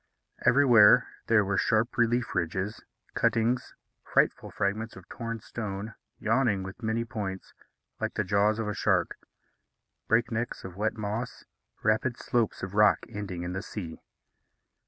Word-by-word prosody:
Everywhere 120 Hz, -7 st, +7 dB, 0.2 s
there 110 Hz, -3 st, +4 dB
were 95 Hz, 0 st, +1 dB
sharp 110 Hz, +1 st, +1 dB
relief 120 Hz, 0 st, +1 dB
ridges, 95 Hz, +4 st, -2 dB, 0.3 s
cuttings, 115 Hz, +2 st, +1 dB, 0.3 s
frightful -, -, +1 dB
fragments 110 Hz, +3 st, -2 dB
of 95 Hz, -, -13 dB
torn 115 Hz, -1 st, -5 dB
stone, 105 Hz, -1 st, -5 dB, 0.2 s
yawning 110 Hz, -3 st, +1 dB
with 95 Hz, +5 st, -9 dB
many 115 Hz, +1 st, -1 dB
points, 100 Hz, -5 st, -5 dB, 0.5 s
like -, -, -3 dB
the -, -, +1 dB
jaws 100 Hz, +2 st, +2 dB
of 110 Hz, -2 st, -2 dB
a 105 Hz, -, -1 dB
shark; -, -, +1 dB, 0.9 s
breaknecks 115 Hz, 0 st, 0 dB
of 95 Hz, -2 st, -8 dB
wet 110 Hz, +3 st, -1 dB
moss, 110 Hz, +3 st, -4 dB, 0.4 s
rapid 110 Hz, +3 st, +1 dB
slopes 120 Hz, -3 st, -1 dB
of 95 Hz, 0 st, -4 dB
rock 105 Hz, 0 st, +4 dB
ending 100 Hz, -5 st, -5 dB
in 90 Hz, +1 st, -4 dB
the 95 Hz, -, -3 dB
sea. 85 Hz, -7 st, -7 dB
110 Hz, 135 wpm, -28 LUFS, 100-115 Hz, 0.9 s, Everywhere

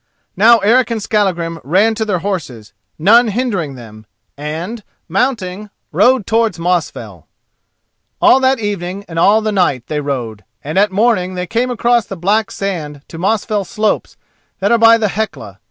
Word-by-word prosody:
Now 230 Hz, +5 st, +6 dB
Eric 230 Hz, +5 st, +2 dB
and 230 Hz, -1 st, -2 dB
Skallagrim 180 Hz, -6 st, -1 dB
ran 195 Hz, +9 st, +2 dB
to 220 Hz, 0 st, -2 dB
their 200 Hz, -4 st, 0 dB
horses, 135 Hz, -, -5 dB, 0.2 s
none 230 Hz, +9 st, +5 dB
hindering 200 Hz, -, -2 dB
them, 110 Hz, -3 st, -13 dB, 0.3 s
and, 165 Hz, +10 st, -6 dB, 0.2 s
mounting, 195 Hz, 0 st, -2 dB, 0.2 s
rode 215 Hz, +6 st, +3 dB
towards 225 Hz, -1 st, +1 dB
Mosfell. 175 Hz, 0 st, -3 dB, 0.9 s
All 265 Hz, -, +5 dB
that 265 Hz, 0 st, +2 dB
evening 200 Hz, -2 st, -4 dB
and 165 Hz, -1 st, -4 dB
all 210 Hz, +5 st, +4 dB
the 215 Hz, 0 st, -1 dB
night 145 Hz, -, 0 dB
they 150 Hz, +2 st, -3 dB
rode, 120 Hz, -7 st, -4 dB, 0.2 s
and 155 Hz, +6 st, -1 dB
at 205 Hz, 0 st, +3 dB
morning 190 Hz, -3 st, +1 dB
they 180 Hz, 0 st, -3 dB
came 235 Hz, +6 st, -1 dB
across 240 Hz, -2 st, +1 dB
the 195 Hz, -, -7 dB
black 205 Hz, +5 st, +1 dB
sand 155 Hz, -8 st, -5 dB
to 165 Hz, -, -9 dB
Mosfell 210 Hz, +2 st, 0 dB
slopes 215 Hz, +2 st, -2 dB, 0.4 s
that 200 Hz, +3 st, 0 dB
are 235 Hz, -, +4 dB
by 230 Hz, 0 st, +7 dB
the 215 Hz, -2 st, 0 dB
Hecla. 220 Hz, +3 st, -5 dB
200 Hz, 160 wpm, -16 LUFS, 165-225 Hz, 0.9 s, by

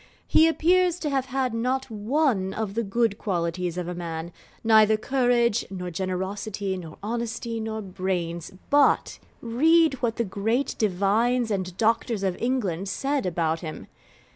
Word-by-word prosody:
He 320 Hz, -, +6 dB
appears 355 Hz, +2 st, +3 dB
to 305 Hz, -4 st, -3 dB
have 270 Hz, -2 st, 0 dB
had 260 Hz, -2 st, -1 dB
not 255 Hz, +3 st, -1 dB
one 215 Hz, -3 st, 0 dB
of 215 Hz, -3 st, -3 dB
the 230 Hz, -, 0 dB
good 225 Hz, 0 st, 0 dB
qualities 175 Hz, -2 st, -2 dB
of 180 Hz, -1 st, -3 dB
a 180 Hz, -, -3 dB
man 170 Hz, -1 st, -5 dB, 0.3 s
neither 220 Hz, -1 st, +5 dB
courage, 240 Hz, -2 st, +2 dB
nor 180 Hz, -2 st, -5 dB
generosity, 190 Hz, +2 st, -3 dB
nor 165 Hz, -4 st, -8 dB
honesty, 230 Hz, +1 st, -3 dB
nor 220 Hz, -1 st, -4 dB
brains; 180 Hz, -3 st, -3 dB, 0.2 s
but 290 Hz, -1 st, +3 dB, 0.2 s
read 315 Hz, +7 st, +4 dB
what 230 Hz, -2 st, 0 dB
the 235 Hz, -, 0 dB
great 225 Hz, +7 st, -1 dB
Divines 220 Hz, +4 st, +1 dB
and 185 Hz, -2 st, -3 dB
Doctors 225 Hz, -1 st, +1 dB
of 190 Hz, -2 st, 0 dB
England 200 Hz, -7 st, -1 dB
said 270 Hz, +3 st, -1 dB
about 165 Hz, -2 st, 0 dB
him! 160 Hz, -2 st, -7 dB
220 Hz, 145 wpm, -25 LUFS, 185-245 Hz, 0.3 s, He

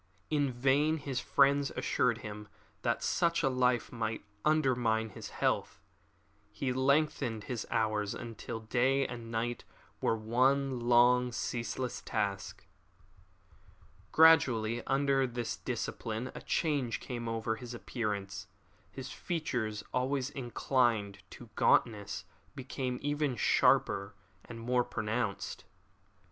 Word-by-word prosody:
In 145 Hz, -3 st, +2 dB
vain 135 Hz, +5 st, +2 dB
his 140 Hz, -4 st, -3 dB
friends 140 Hz, +1 st, +3 dB
assured 120 Hz, -3 st, +1 dB
him 105 Hz, 0 st, -7 dB, 0.3 s
that -, -, 0 dB
such 170 Hz, -1 st, +1 dB
a 135 Hz, -, +4 dB
life 125 Hz, -2 st, +1 dB
must 110 Hz, -2 st, -3 dB, 0.2 s
undermine 125 Hz, -7 st, +2 dB
his -, -, -8 dB
health. -, -, -1 dB, 0.7 s
He 130 Hz, -2 st, -2 dB
lengthened 130 Hz, -4 st, +1 dB
his 120 Hz, -4 st, -4 dB
hours 105 Hz, -2 st, 0 dB
until 115 Hz, -1 st, -6 dB
day 130 Hz, +4 st, +2 dB
and 120 Hz, -2 st, -6 dB
night 115 Hz, +1 st, -2 dB, 0.4 s
were 115 Hz, -, +2 dB
one 130 Hz, +4 st, +2 dB
long, 125 Hz, +1 st, +4 dB
ceaseless 120 Hz, +1 st, -3 dB
task. 100 Hz, -1 st, -3 dB, 1.5 s
Gradually 120 Hz, -8 st, +5 dB
under 135 Hz, -1 st, +2 dB
this 120 Hz, -1 st, -4 dB
discipline 115 Hz, +3 st, -4 dB
a -, -, -8 dB
change 140 Hz, -8 st, 0 dB
came 120 Hz, -2 st, -5 dB
over 110 Hz, 0 st, -1 dB
his 125 Hz, -1 st, -7 dB
appearance. 100 Hz, -4 st, -4 dB, 0.4 s
His -, -, -8 dB
features, 120 Hz, -11 st, -3 dB
always 130 Hz, +1 st, 0 dB
inclined 120 Hz, -6 st, 0 dB
to -, -, -12 dB
gauntness, 100 Hz, -5 st, +2 dB, 0.3 s
became 130 Hz, -1 st, -3 dB
even 145 Hz, -2 st, 0 dB
sharper 100 Hz, -2 st, +3 dB, 0.3 s
and 115 Hz, -1 st, -9 dB
more 125 Hz, +2 st, +1 dB
pronounced. 110 Hz, -2 st, -3 dB
120 Hz, 110 wpm, -32 LUFS, 110-135 Hz, 1.5 s, Gradually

